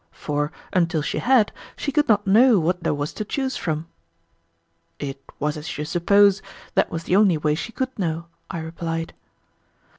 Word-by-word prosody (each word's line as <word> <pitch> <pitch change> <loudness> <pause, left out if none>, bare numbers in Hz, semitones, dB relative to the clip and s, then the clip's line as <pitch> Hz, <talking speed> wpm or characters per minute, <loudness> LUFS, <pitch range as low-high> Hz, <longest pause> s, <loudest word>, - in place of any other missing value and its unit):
for, 145 0 -2 0.2
until 170 -3 +2
she - - -2
had, 245 -4 +4 0.2
she 285 - -3
could 295 +1 +2
not 205 -1 +4
know 225 +4 +6
what 180 +1 0
there - - 0
was 145 0 -2
to 215 - -4
choose 265 +5 -2
from." 160 -1 -3 1.1
"It 135 +3 -5 0.2
was 150 +1 -1
as 150 +1 -6
you 150 - -3
suppose; 195 +4 +4 0.3
that - - +2
was 165 0 -4
the 180 - +1
only 195 -5 +5
way 150 0 +1
she 195 +9 -4
could 260 -1 -4
know," 165 -2 -1 0.2
I 165 - -4
replied. 165 0 -4
170 Hz, 175 wpm, -23 LUFS, 155-205 Hz, 1.1 s, know